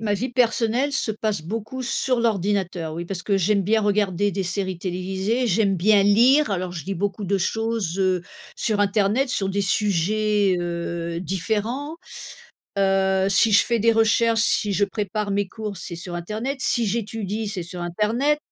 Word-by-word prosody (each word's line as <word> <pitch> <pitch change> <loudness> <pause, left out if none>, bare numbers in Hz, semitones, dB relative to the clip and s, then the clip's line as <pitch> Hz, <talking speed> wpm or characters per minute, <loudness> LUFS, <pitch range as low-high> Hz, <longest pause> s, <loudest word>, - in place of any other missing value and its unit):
Ma 210 -2 0
vie 240 +5 -3
personnelle 240 +2 +1
se 265 -5 0
passe 215 -5 -2
beaucoup 225 +8 -5
sur 255 0 0
l'ordinateur, 190 -7 -1
oui. 170 - -4
Parce 180 0 -5
que 200 -2 +1
j'aime 200 +2 +2
bien 220 +3 +2
regarder 205 -1 +1
des 195 - -2
séries 185 0 -2
télévisées, 190 +7 -2
j'aime 195 -1 +2
bien 200 +3 +4
lire, 240 +8 +4
alors 185 -2 -2
je 170 +1 -7
lis 195 - -2
beaucoup 200 +2 -3
de 200 +2 +1
choses, 220 -2 -1
heu, 185 -2 +1 0.3
sur 210 -2 0
internet 205 +6 +2
sur 195 -6 -1
des 200 +1 -1
sujets, 205 +1 +1
heu, 170 -1 -3
différents. 220 - -2 0.8
Heu, 190 -1 +2
si 200 +3 +4
je 205 - +5
fais 235 -2 +1
des 230 - +4
recherches, 225 0 +3
si 210 -2 +1
je 200 +1 +2
prépare 205 0 -3
mes 200 -1 0
cours, 215 -1 -6
c'est 170 -1 -6
sur 175 +1 -7
internet. 215 +10 -4
Si 235 -4 +2
j'étudie, 215 0 -3
c'est 190 -4 -4
sur 175 +1 -8
internet. 220 - 0
205 Hz, 170 wpm, -23 LUFS, 185-225 Hz, 0.8 s, je